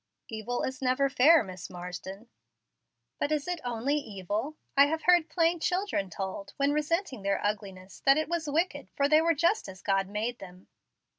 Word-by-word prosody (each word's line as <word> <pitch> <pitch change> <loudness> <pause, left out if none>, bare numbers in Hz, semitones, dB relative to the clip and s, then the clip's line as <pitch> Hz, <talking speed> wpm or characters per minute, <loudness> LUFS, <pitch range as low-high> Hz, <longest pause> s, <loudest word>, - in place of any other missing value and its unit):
"Evil 225 +2 -3
is 260 0 -4
never 265 +2 +2
fair, 300 +5 +6
Miss 185 -4 -8
Marsden." 180 +4 -8 0.9
"But 290 - -1
is 300 0 0
it 355 -2 -3
only 245 +4 -1
evil? 215 - -4 0.2
I 280 +1 +7
have 320 +2 -2
heard 350 -2 +4
plain 335 -1 +2
children 360 - -1
told, 200 - -6
when 280 +1 +2
resenting 300 - -1
their 200 0 0
ugliness, 195 -2 -4
that 275 +1 +7
it 310 - 0
was 330 -2 -2
wicked, 330 +5 -1
for 280 - +2
they 305 +2 +5
were 330 0 +2
just 340 - +1
as 190 -1 -12
God 195 -1 +1
made 220 +4 -3
them." 180 -1 -12
270 Hz, 175 wpm, -29 LUFS, 195-315 Hz, 0.9 s, I